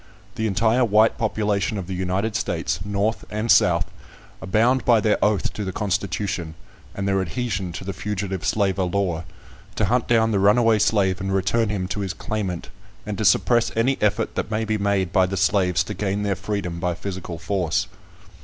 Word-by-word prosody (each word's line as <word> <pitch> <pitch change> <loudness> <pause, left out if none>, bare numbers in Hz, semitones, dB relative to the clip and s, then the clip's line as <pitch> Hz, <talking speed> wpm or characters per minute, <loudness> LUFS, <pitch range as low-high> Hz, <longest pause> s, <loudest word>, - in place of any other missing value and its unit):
The 110 -2 -1
entire 115 +5 +2
white 110 0 +3
population 105 -1 0
of 95 - -4
the 95 - -5
United 95 +4 -1
States, 110 -1 -1
North 100 +2 -1
and 105 +2 0
South, - - +4 0.6
are - - -7
bound 120 +7 +3
by 120 -2 +5
their 105 0 +1
oath 105 -2 +1
to 105 - -4
the 95 - -3
constitution, 95 -3 -2 0.4
and 100 0 -2
their 95 -1 +2
adhesion 95 0 -3
to 85 - -6
the 100 +1 -4
Fugitive 95 -1 -4
Slaver 100 -2 +1
Law, 90 -3 -1 0.5
to 105 - +1
hunt 120 +4 +1
down 115 -1 +3
the 100 - +1
runaway 110 +2 +4
slave 100 -3 +2
and 95 0 -2
return 100 +4 +1
him 95 -3 -2
to 105 - -3
his 95 -1 -3
claimant, 95 -5 -4 0.4
and 105 0 -3
to 110 - 0
suppress 120 +4 +3
any 130 +4 +2
effort 105 +2 +1
that - - -3
may 110 0 -1
be 110 0 -1
made 100 -3 0
by 95 -1 +4
the 100 +1 -3
slaves 90 0 +2
to 105 - -6
gain 105 0 -2
their 100 -1 0
freedom 100 -3 -4
by 90 -1 -1
physical 90 -2 -6
force. 95 +2 -1
100 Hz, 190 wpm, -23 LUFS, 95-110 Hz, 0.6 s, by